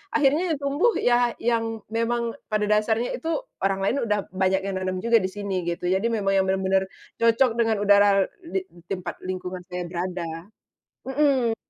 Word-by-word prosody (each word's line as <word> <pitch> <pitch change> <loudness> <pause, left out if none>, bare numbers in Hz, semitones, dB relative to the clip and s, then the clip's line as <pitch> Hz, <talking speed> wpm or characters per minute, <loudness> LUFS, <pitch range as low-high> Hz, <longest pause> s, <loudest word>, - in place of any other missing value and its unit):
akhirnya 305 +4 +3
yang - - -7
tumbuh 290 +12 +2
ya 240 -1 +2
yang 225 -1 0
memang 230 +1 0 0.2
pada 215 -1 0
dasarnya 215 +3 +1
itu, 330 - -2 0.2
orang 195 0 0
lain 220 +7 +1
udah 210 -1 +1
banyak 190 0 +1
yang 195 -1 -2
nanam 185 +1 -3
juga 235 0 +5
di 185 - -1
sini, 190 -3 -4
gitu. 170 0 -3
Jadi 195 +5 +2
memang 205 -4 0
yang 190 -1 +2
benar-benar, 190 0 +1 0.3
cocok 230 +2 +4
dengan 225 -1 +3
udara 200 -1 +5 0.2
di 370 +2 -3 0.2
tempat 180 -3 -5
lingkungan 185 0 -5
saya 180 -1 -4
berada. 175 -1 -4 0.6
Mhm. 265 -5 +2
210 Hz, 165 wpm, -25 LUFS, 190-235 Hz, 0.6 s, juga